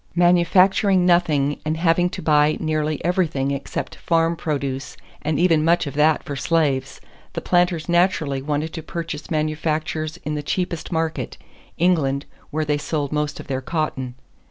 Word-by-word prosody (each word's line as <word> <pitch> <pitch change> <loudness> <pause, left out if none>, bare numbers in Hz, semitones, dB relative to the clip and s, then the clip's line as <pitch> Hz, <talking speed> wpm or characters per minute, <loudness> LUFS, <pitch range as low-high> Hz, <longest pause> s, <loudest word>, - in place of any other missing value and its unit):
Manufacturing 180 +2 +4
nothing 155 -5 +2
and 155 +1 -1
having 170 +1 +2
to - - -7
buy 150 -1 +3
nearly 155 -1 -1
everything 160 -7 +1
except 140 0 -4
farm 165 0 +1
produce 140 -5 -3 0.2
and 155 -1 -1
even 165 -3 +4
much 170 +1 +3
of 140 - -5
that 150 +2 +3
for 145 - -5
slaves, 135 -4 0 0.3
the - - -2
planters 175 -3 +1
naturally 175 -6 +2
wanted 150 +3 -2
to 165 - -5
purchase 165 -2 -6
manufactures 155 0 -1
in 150 - -2
the 150 - -2
cheapest 170 +3 -3
market, 160 -1 -2 0.4
England, 150 -6 +2 0.2
where 155 +1 -1
they 150 0 0
sold 145 -2 -2
most 150 -1 -2
of - - -8
their 130 -1 -3
cotton. 130 -4 -3
155 Hz, 155 wpm, -22 LUFS, 145-170 Hz, 0.4 s, Manufacturing